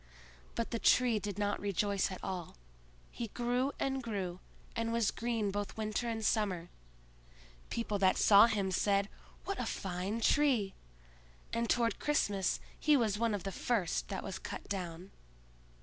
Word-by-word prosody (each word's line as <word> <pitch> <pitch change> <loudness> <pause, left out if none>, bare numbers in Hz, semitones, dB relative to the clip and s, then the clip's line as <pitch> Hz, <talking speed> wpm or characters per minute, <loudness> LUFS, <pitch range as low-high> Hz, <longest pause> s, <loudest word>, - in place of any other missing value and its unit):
But 230 - -2
the 230 - -1
Tree 240 -2 +4
did 205 -1 -4
not 205 0 0
rejoice 200 0 0
at 185 - -7
all; 180 -3 -4 0.6
he 235 - -4
grew 245 +4 0
and 270 -1 0
grew, 195 -6 -3 0.4
and 230 0 -1
was 230 -2 +2
green 230 -3 -1
both 205 +1 -4
winter 215 +2 -1
and 225 -1 -2
summer. 185 -6 +1 1.0
People 215 -3 -2
that 190 -1 +4
saw 205 +2 +8
him 200 -4 0
said, 200 +2 +2 0.4
"What 395 - -3
a 250 - -1
fine 190 +3 -3
tree!" 240 -6 +3 0.8
and 230 0 0
toward 230 -3 +2
Christmas 205 -10 +1 0.2
he 300 -2 +5
was 215 -4 +1
one 230 -2 +2
of 195 - -5
the 195 - -3
first 200 -3 0
that 195 -2 -4
was 185 - -5
cut - - -7
down. 180 -1 -5
210 Hz, 155 wpm, -33 LUFS, 195-230 Hz, 1.0 s, saw